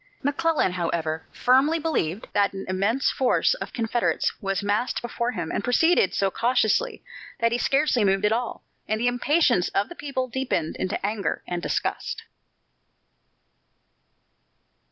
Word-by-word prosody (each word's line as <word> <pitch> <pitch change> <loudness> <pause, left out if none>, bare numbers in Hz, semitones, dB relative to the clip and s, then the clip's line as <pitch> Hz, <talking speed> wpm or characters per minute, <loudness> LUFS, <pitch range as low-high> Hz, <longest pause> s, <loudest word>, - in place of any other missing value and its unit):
McClellan, 295 - +1
however, 165 -3 -2
firmly 270 +6 +3
believed 230 - -2
that 200 -1 +2
an 195 - -6
immense 200 +8 +1
force 260 - +2
of - - -6
Confederates 235 0 0
was 195 -1 -1
massed 205 +5 0
before 240 0 -3
him 170 -6 -4
and - - -2
proceeded 245 - +3
so 195 -1 +1
cautiously 245 - +1 0.4
that 230 0 +2
he 240 - 0
scarcely 275 -3 +2
moved 195 +1 +2
at 210 - +3
all, 235 +1 -2 0.2
and 215 0 -1
the 240 - 0
impatience 245 - +2
of 200 - +1
the 345 - -9
people 270 -4 -3
deepened 245 -11 -2
into 190 +1 -2
anger 205 -1 -2
and 175 -1 -3
disgust. - - -2
230 Hz, 140 wpm, -25 LUFS, 195-265 Hz, 0.4 s, firmly